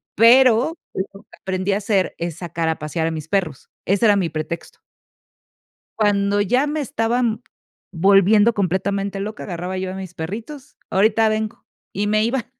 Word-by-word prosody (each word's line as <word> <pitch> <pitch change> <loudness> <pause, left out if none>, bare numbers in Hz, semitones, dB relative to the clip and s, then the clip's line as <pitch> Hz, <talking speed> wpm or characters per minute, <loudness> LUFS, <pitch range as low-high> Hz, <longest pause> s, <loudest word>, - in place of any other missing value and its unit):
pero 250 - +5 0.2
lo 195 +1 -5
que - - -19
aprendí 190 +1 -1
a - - +1
hacer 195 -3 0
es 170 -2 -4
sacar 170 -2 -3
a 160 - -2
pasear 160 +2 -2
a - - -1
mis 160 -1 -6
perros. 175 -7 -2 0.2
Ese 200 +4 +2
era 210 -2 +6
mi 185 -4 0
pretexto. 155 +2 -6 1.2
Cuando 205 -1 +2
ya 250 +8 +2
me 300 +1 -2
estaban 230 -2 -1 0.5
volviendo 200 +5 +4
completamente 195 +1 -1
loca, 210 +2 -5
agarraba 180 0 -5
yo 185 0 -3
a - - -7
mis 190 -2 -7
perritos: 225 - -7
"Ahorita 220 +3 +3
vengo" 215 0 -3 0.3
y 205 +2 -1
me 215 +1 +2
iba. 235 +1 -1
200 Hz, 160 wpm, -21 LUFS, 185-220 Hz, 1.2 s, era